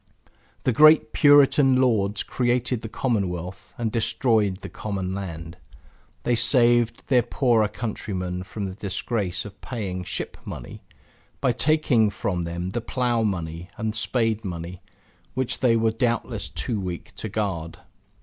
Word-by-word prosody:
The 125 - +2
great 155 -3 +6
Puritan 145 -2 +6
lords 110 -5 +2
created 125 -1 0
the 110 - -6
Commonwealth, 95 -7 -2
and 115 -2 -1
destroyed 110 -4 +1
the - - -6
common 95 -3 -4
land. 85 -3 -6 0.7
They 120 - +1
saved 120 -1 +3
their 125 -3 +4
poorer 120 -2 +2
countrymen 95 -5 -4
from 100 +2 -5
the 95 - -5
disgrace 100 0 -2
of 100 -1 -11
paying 95 -7 -4
Ship - - -4
Money, - - -8 0.6
by 125 - +2
taking 125 -4 +3
from 95 -3 -2
them 85 +2 -4
the 120 - -2
plow 120 0 0
money 85 -4 -3
and 110 -2 -2
spade 115 0 0
money 90 -1 -6 0.5
which 130 -1 -1
they 120 -3 +4
were 115 0 +2
doubtless 115 +1 -1
too 110 -4 -3
weak 90 -3 -6
to 110 - -5
guard. 95 -6 -3
110 Hz, 140 wpm, -24 LUFS, 95-120 Hz, 0.7 s, great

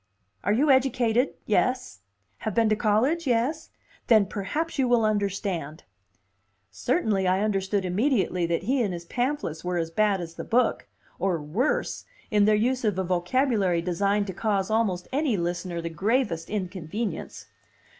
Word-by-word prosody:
"Are 200 - +1
you 275 +7 +3
educated, 250 -2 +2
yes? 250 - 0 0.4
Have 220 - -4
been 225 -2 +3
to 215 - +3
college, 245 +10 +1
yes? 255 +7 0 0.4
Then 220 -4 +6
perhaps 290 +12 -3
you 260 - +3
will 240 -2 +3
understand." 195 -7 -2 0.9
Certainly 200 - 0
I 185 +2 +2
understood 195 -1 0
immediately 185 -3 +1
that 170 0 -1
he 260 +5 +1
and 205 -5 0
his 170 0 -8
pamphlets 245 - -2
were 180 0 -1
as 165 -1 -2
bad 205 +1 +2
as 165 -2 -6
the - - -7
book, 250 +2 +1 0.3
or 185 -4 0
worse, 225 - -1 0.3
in 210 -1 +4
their 215 0 +4
use 245 +4 0
of 210 -4 +1
a 190 - 0
vocabulary 185 0 +1
designed 200 +4 +1
to 190 - -5
cause 200 0 -1
almost 200 -5 0
any 275 -6 +1
listener 175 0 -3
the 165 - -4
gravest 200 - 0
inconvenience. 195 0 -4
205 Hz, 155 wpm, -26 LUFS, 180-245 Hz, 0.9 s, Then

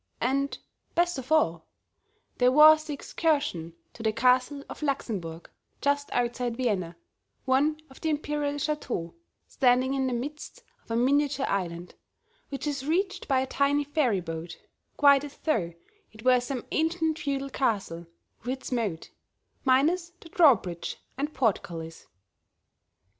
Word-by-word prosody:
And, 275 +3 0 0.4
best 345 -3 +2
of 265 +3 -10
all, 170 - +2 0.7
there 250 0 +5
was 310 +2 +7
the 305 - -4
excursion 280 - -1 0.2
to - - -11
the 220 -1 +1
Castle 255 +5 +2
of - - -9
Laxenburg 195 - -3 0.3
just 285 0 0
outside 240 -1 -1
Vienna, 195 -9 -1 0.5
one 290 +4 +2
of 265 - -17
the 320 - 0
imperial 295 -1 -1
chateaux, 290 - -3 0.3
standing 255 +1 +2
in 265 -1 0
the 255 - -1
midst 290 +6 -6 0.2
of - - -29
a 230 - -1
miniature 275 +3 +2
island, 175 -2 -3 0.6
which 275 +1 -5
is 285 -3 -2
reached 380 +5 0
by 265 -2 +3
a - - -1
tiny 280 +2 +1
ferry 275 -9 +1
boat, 165 0 -6 0.4
quite 280 -1 +6
as 290 -1 -9
though 215 - 0 0.4
it 220 +1 -14
were 255 -1 +6
some 250 -1 -4
ancient 320 0 0
feudal 275 -4 -2
castle 195 -11 -1 0.4
with 255 +3 -2
its 260 - -9
moat, 215 -10 -2 0.5
minus 310 +7 +3
the 330 - -13
drawbridge 230 - +3 0.2
and 285 +3 -2
portcullis. 170 -8 -2
265 Hz, 140 wpm, -27 LUFS, 225-295 Hz, 0.7 s, was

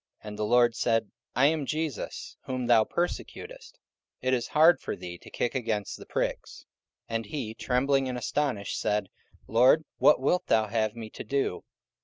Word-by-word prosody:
And 105 -1 -7
the 105 - -2
Lord 120 0 +4
said, 115 -3 +1 0.2
I 130 +3 +4
am 155 0 +2
Jesus 155 -6 -4
whom 130 -1 -3
thou 120 -2 +5
persecutest: 445 - -4 0.4
it 130 0 0
is 120 -2 0
hard 160 +3 +5
for - - -4
thee 90 -1 -8
to - - -14
kick 120 - -2
against 110 -6 -2
the - - -12
pricks. - - -3 0.4
44:009:006 115 - -4
And 115 0 -1
he 130 -8 -4
trembling 135 +3 +1
and 125 - -3
astonished 125 -4 -1
said, 105 -2 0 0.4
Lord, 130 +7 +4
what - - +6
wilt 160 +7 +1
thou 110 -1 +3
have 110 -1 0
me 110 -2 -8
to - - -8
do? 135 -9 -1
120 Hz, 175 wpm, -28 LUFS, 110-140 Hz, 0.4 s, what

